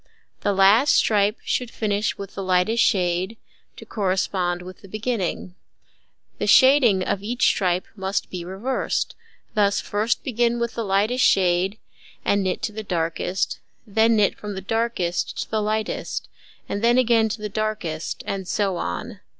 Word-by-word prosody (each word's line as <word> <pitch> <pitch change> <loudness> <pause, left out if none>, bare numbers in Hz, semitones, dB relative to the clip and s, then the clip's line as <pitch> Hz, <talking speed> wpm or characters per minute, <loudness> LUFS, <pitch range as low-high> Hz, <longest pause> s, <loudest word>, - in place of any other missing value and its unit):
The 205 - 0
last 200 +8 +5
stripe 210 0 +3
should 250 -2 -1
finish 210 -2 -1
with 200 -1 -8
the 195 - -5
lightest 185 +5 +2
shade, 185 +1 +1 0.4
to - - -10
correspond 185 -3 -1
with 185 +1 -11
the 195 - -13
beginning. 215 -4 -3 0.9
The - - -1
shading 260 -8 +6
of 190 - -1
each 240 +5 0
stripe 180 -2 +2
must 190 -1 -2
be 180 -2 -5
reversed; 195 +9 -2 0.4
thus, 205 -2 +2
first 215 +3 -1
begin 240 -1 +1
with 235 -1 -2
the 230 - -3
lightest 210 +5 +1
shade 185 +2 +3 0.5
and 200 0 +2
knit 185 -1 -2
to 215 - -1
the 220 +1 -6
darkest, 175 -1 -2 0.3
then 225 +2 +3
knit 210 -2 +3
from 210 -1 -6
the 190 - -5
darkest 225 -4 -1
to - - -17
the 220 -1 +1
lightest, 215 +1 -2 0.4
and 205 - -3
then 240 +1 +4
again 230 -3 +3
to 215 - -4
the 210 - -3
darkest, 210 -7 -3
and 190 -2 -4
so 195 -3 0
on. 215 +2 -4
205 Hz, 160 wpm, -23 LUFS, 185-225 Hz, 0.9 s, shading